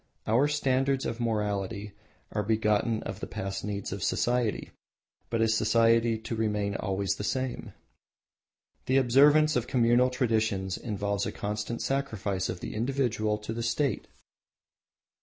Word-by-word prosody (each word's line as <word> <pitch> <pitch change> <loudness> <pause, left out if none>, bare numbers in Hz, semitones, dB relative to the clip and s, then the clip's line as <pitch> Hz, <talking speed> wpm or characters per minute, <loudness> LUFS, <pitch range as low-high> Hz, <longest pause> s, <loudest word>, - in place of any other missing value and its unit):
Our 120 +6 +3
standards 135 -2 +1
of 115 - -3
morality 105 -2 -2 0.4
are 105 - -1
begotten 110 +1 +1
of - - -6
the - - -5
past 95 0 -4
needs 100 -1 -4
of 100 0 -5
society, 120 0 0 0.6
but 115 -1 +1
is 110 0 +2
society 115 +1 +3
to 110 +1 -5
remain 105 -2 -1
always 95 -1 -1
the - - -4
same? 130 +3 -3 1.1
The 130 +1 +3
observance 145 +4 +5
of 125 0 0
communal 125 0 +3
traditions 110 -6 0
involves 100 -2 -2
a - - -3
constant 105 +3 -4
sacrifice 110 -9 -1
of 90 - -5
the - - -5
individual 115 -3 0
to 105 +1 -6
the 115 - -4
state. 120 +4 -1
110 Hz, 140 wpm, -28 LUFS, 105-125 Hz, 1.1 s, observance